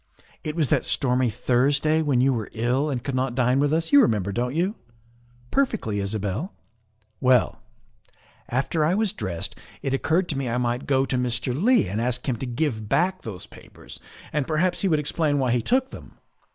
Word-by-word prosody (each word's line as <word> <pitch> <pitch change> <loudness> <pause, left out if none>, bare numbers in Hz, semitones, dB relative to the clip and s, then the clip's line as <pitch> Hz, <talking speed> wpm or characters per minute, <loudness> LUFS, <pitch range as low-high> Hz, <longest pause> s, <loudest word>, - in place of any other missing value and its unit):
It 155 0 -4
was 155 -6 +1
that - - +2
stormy 125 -1 +1
Thursday 140 +8 +2
when 140 -5 +2
you 135 +1 +3
were 110 -4 -3
ill 125 +6 0
and 125 -4 -3
could 140 - -3
not 130 -1 -1
dine 130 +1 +2
with 145 0 +2
us 160 +1 0
you 285 - +8
remember, 100 - +1
don't 125 +5 -2
you?" 180 +5 +1 0.8
"Perfectly, 220 - 0
Isabel." 105 - -3 0.3
' 110 0 -42
Well, 125 -3 +3 0.9
after 140 +6 0
I 165 +5 +2
was 215 -2 0
dressed 95 -6 -4 0.3
it 135 - -1
occurred 165 +6 +1
to 145 - -2
me 130 -3 -2
I 120 - -1
might 120 +1 -1
go 135 -1 +3
to 130 -2 -1
Mr. 125 0 -1
Leigh 210 - +3
and 105 +5 -2
ask 125 +2 -1
him 125 -3 0
to 130 - -5
give 120 -4 -2
back 185 +2 +1
those 100 -5 -7
papers, - - -11 0.3
and 150 -3 0
perhaps 175 +3 +1
he 195 - +2
would 160 -4 +3
explain 150 0 0
why 130 -3 +1
he 120 0 +2
took 260 - +1
them. - - -12
130 Hz, 195 wpm, -24 LUFS, 120-155 Hz, 0.9 s, you